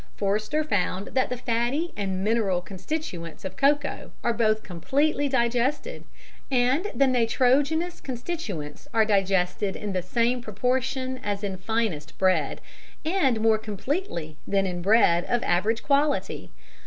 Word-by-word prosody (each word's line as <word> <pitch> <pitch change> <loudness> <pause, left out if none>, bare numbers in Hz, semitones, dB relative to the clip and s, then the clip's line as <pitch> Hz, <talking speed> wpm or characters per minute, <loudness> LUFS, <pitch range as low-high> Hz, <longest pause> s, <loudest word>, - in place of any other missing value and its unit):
Forster 215 +10 0
found 195 -7 -1
that 260 - +1
the 250 - -3
fatty 240 +8 -1
and 190 -2 -2
mineral 210 -4 +2
constituents 185 - -6
of 190 0 -5
cocoa 285 +3 +1
are 235 - +2
both 220 -1 +1
completely 280 - 0
digested, 260 - 0 0.4
and 260 +8 +2
the 275 - +4
nitrogenous 270 +7 +2
constituents 240 - -5
are 220 -1 +5
digested 195 -1 +1
in 205 -2 -4
the 185 - 0
same 235 +7 +1
proportion 255 +4 -1
as 205 0 -2
in 195 -2 -2
finest 185 -6 -2
bread, 185 -1 +1 0.4
and 285 - +2
more 220 -1 +4
completely 210 - -3
than 195 -1 +2
in 180 -2 -3
bread 175 -3 +4
of 240 -1 0
average 210 +6 +1
quality. 290 +1 +1
230 Hz, 130 wpm, -26 LUFS, 195-265 Hz, 0.4 s, are